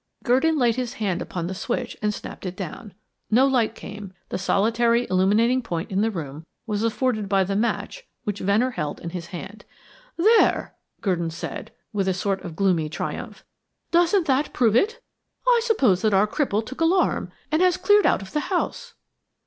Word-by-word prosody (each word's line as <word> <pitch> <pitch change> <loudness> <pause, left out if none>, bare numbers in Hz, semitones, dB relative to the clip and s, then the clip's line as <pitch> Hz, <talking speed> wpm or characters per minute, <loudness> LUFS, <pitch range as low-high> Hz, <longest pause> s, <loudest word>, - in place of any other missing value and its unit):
Gurdon 275 +6 +3
laid 240 -3 +2
his 250 -1 -2
hand 200 -9 -2
upon 175 -2 -4
the 185 - -3
switch 240 +5 -3
and 210 0 +1
snapped 200 - -7
it 180 - -5
down. 190 +2 -7 0.3
No 245 +5 +5
light 250 -5 +1
came; 200 -2 -9 0.2
the - - -3
solitary 230 +5 +2
illuminating 215 +7 +3
point 170 -8 -4
in 195 +1 +1
the 225 - +2
room 155 -6 -6 0.2
was 210 -2 -2
afforded 230 -2 0
by 195 -1 +3
the 195 +1 -2
match 235 - -2 0.2
which 205 -1 -3
Venner 215 +7 +2
held 150 -10 -4
in 170 - -6
his 175 -1 -6
hand. 195 +4 -8 0.5
"There," 435 +7 +3 0.3
Gurdon 175 -5 0
said, 165 0 -6 0.2
with 195 -2 0
a 190 - +1
sort 195 +1 -1
of 175 -4 -8
gloomy 170 -5 +1
triumph. 155 - -6 0.5
"Doesn't 350 +2 +3
that 280 0 +1
prove 225 -3 +3
it? 445 - +2 0.5
I 480 -2 +5
suppose 270 - +3
that 215 -3 +2
our 195 +2 +5
cripple 220 -2 -1
took 265 +7 -8
alarm 355 +3 +2 0.2
and 310 +3 +2
has 365 -1 +4
cleared 415 +1 +4
out - - +2
of 190 - -12
the 300 - +1
house." 475 +6 -2
215 Hz, 180 wpm, -24 LUFS, 190-265 Hz, 0.5 s, No